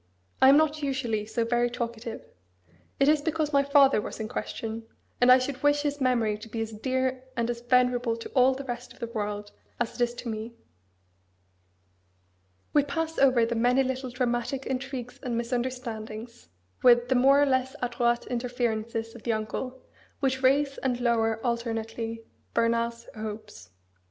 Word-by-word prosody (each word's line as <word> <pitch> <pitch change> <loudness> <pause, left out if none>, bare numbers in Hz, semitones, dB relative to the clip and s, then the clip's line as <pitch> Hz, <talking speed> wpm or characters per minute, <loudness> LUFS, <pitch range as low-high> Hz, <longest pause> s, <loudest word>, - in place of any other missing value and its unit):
I 265 - +8
am 280 - +8
not 310 0 +2
usually 240 -7 -1
so 230 +1 -1
very 240 +1 +2
talkative. 235 -1 -5 0.7
It 275 - +4
is 300 0 +4
because 310 -1 -1
my 280 - +5
father 280 -4 +5
was - - -7
in 220 - -3
question; 225 +1 -5 0.3
and 250 +1 +7
I 255 - +9
should 255 +1 -3
wish 290 0 +3
his 290 -1 -2
memory 235 -5 +1
to 225 - -10
be 225 - -4
as 225 0 -3
dear 260 +3 -1
and 235 0 +1
as 235 0 -6
venerable 245 -1 +2
to 230 - -8
all 260 0 +4
the 275 - -6
rest 245 -1 -6
of - - -21
the - - -3
world 210 -2 -4 0.3
as 240 -1 -1
it 245 - 0
is 240 0 -1
to 240 - -7
me." 225 +1 -5 2.2
We 295 - +6
pass 325 +3 -3
over 255 -4 +5
the 235 - -2
many 245 +3 +3
little 260 0 -3
dramatic 245 +1 -1
intrigues 260 -2 -4
and 245 -4 -2
misunderstandings, 235 - -4 0.3
with 240 -1 +5
the - - +4
more 270 +3 +5
or 290 - +5
less 260 -1 0
adroit 240 -1 +1
interferences 235 -2 -2
of 235 - -11
the 230 - 0
uncle, 250 +4 -4 0.4
which 265 -2 0
raise 275 +1 +2
and 250 -2 -1
lower 225 -2 +1
alternately 230 -1 -3 0.3
Bernard's 235 0 0
hopes. 215 - -7
M. - - -37
240 Hz, 170 wpm, -27 LUFS, 230-265 Hz, 2.2 s, I